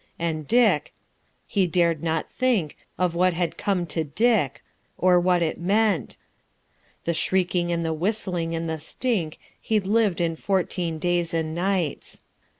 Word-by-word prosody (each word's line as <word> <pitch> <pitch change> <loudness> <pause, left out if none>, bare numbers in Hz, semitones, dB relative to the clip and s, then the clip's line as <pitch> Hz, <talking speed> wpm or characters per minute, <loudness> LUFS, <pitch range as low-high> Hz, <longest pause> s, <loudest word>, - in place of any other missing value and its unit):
And 160 -3 -3
Dick.... 215 -11 +3 0.5
He 195 -3 +1
dared 170 -2 +1
not 160 -1 -1
think 235 - 0 0.2
Of 180 -2 +1
what 180 0 +2
had 175 -1 -1
come 190 -4 -1
to 165 - 0
Dick.... 160 - +1 0.3
or 180 -1 +4
what 175 -1 +2
it 160 - -2
meant 200 - +1 0.9
The 170 - 0
shrieking 175 +1 0
and 170 -1 -1
the 160 - 0
whistling 175 -2 -1
and 165 0 -3
the 160 -1 -3
stink 170 - -2 0.2
He'd 215 -3 0
lived 210 -3 +2
in 165 -1 0
fourteen 180 -2 -1
days 175 0 0
and 160 -1 -1
nights. 180 -3 -2
175 Hz, 150 wpm, -24 LUFS, 165-195 Hz, 0.9 s, or